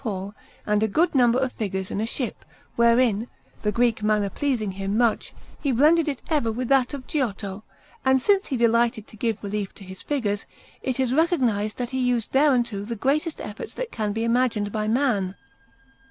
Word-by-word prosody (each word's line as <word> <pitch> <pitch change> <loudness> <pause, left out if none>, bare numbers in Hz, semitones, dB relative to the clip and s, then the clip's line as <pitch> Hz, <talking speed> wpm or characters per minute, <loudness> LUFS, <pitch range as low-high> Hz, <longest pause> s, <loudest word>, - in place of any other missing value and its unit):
Paul, 200 -3 -4 0.3
and 210 0 +2
a 220 - +3
good 320 - +2
number 245 -3 +4
of 260 -1 0
figures 190 -3 -3
in 205 - -2
a 220 - -1
ship, 245 -1 -4 0.3
wherein, 235 -1 +3 0.3
the 210 - 0
Greek 230 0 +1
manner 210 -2 +1
pleasing 245 -7 -1
him 195 +2 -2
much, 235 -2 +1 0.3
he 280 - +1
blended 310 +6 +4
it 280 -4 -3
ever 290 -8 +1
with 245 +2 -3
that 270 0 +3
of 260 -2 -8
Giotto; 205 -7 -3 0.4
and 265 0 +4
since 395 +8 +2
he 265 - -1
delighted 235 -1 +2
to - - -15
give 220 -1 -2
relief 205 -1 -3
to - - -12
his 190 0 -10
figures, 220 -8 -2 0.3
it 260 -1 -2
is 260 -1 +1
recognized 250 - +1
that 245 0 -3
he 260 - -1
used 245 -3 0
thereunto 250 -7 +2
the 230 +3 -4
greatest 300 - 0
efforts 210 +1 -7
that - - -4
can 210 -2 -2
be 225 +2 -2
imagined 230 -3 +1
by 215 0 -2
man. 220 -6 +1
235 Hz, 190 wpm, -24 LUFS, 210-265 Hz, 0.4 s, number